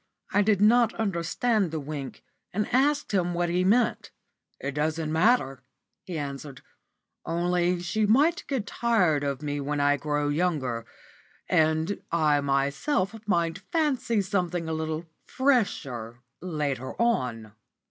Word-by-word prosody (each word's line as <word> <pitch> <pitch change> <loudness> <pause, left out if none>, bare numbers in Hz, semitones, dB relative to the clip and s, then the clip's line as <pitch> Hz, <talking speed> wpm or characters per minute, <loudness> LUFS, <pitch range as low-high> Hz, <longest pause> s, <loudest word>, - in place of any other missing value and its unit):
I 205 - +4
did 205 -1 +2
not 235 +2 +5
understand 205 +1 0
the 160 0 -3
wink, 140 -2 -6 0.3
and 210 +3 -1
asked 285 +3 +2
him 175 -3 0
what 175 0 0
he 180 +1 +1
meant. 220 +5 +2 0.5
"It 140 - -3
doesn't 155 +1 -1
matter," 160 - +2 0.4
he 175 -3 -5
answered, 140 -2 -6 0.6
"only 175 +1 0
she 210 +4 0
might 295 +10 +3
get 260 -7 -2
tired 195 -11 +1
of 140 +1 -3
me 145 -1 -2
when 145 +1 -2
I 145 0 +3
grow 145 0 -1
younger; 145 -8 -1 0.6
and 160 +4 +1
I 155 -3 +3
myself 140 - 0
might 170 -2 +1
fancy 270 - +1
something 180 -4 -1
a 160 - -2
little 160 +1 -3 0.2
fresher 140 - 0 0.2
later 145 -7 -3
on." 125 - 0
170 Hz, 130 wpm, -27 LUFS, 145-210 Hz, 0.6 s, not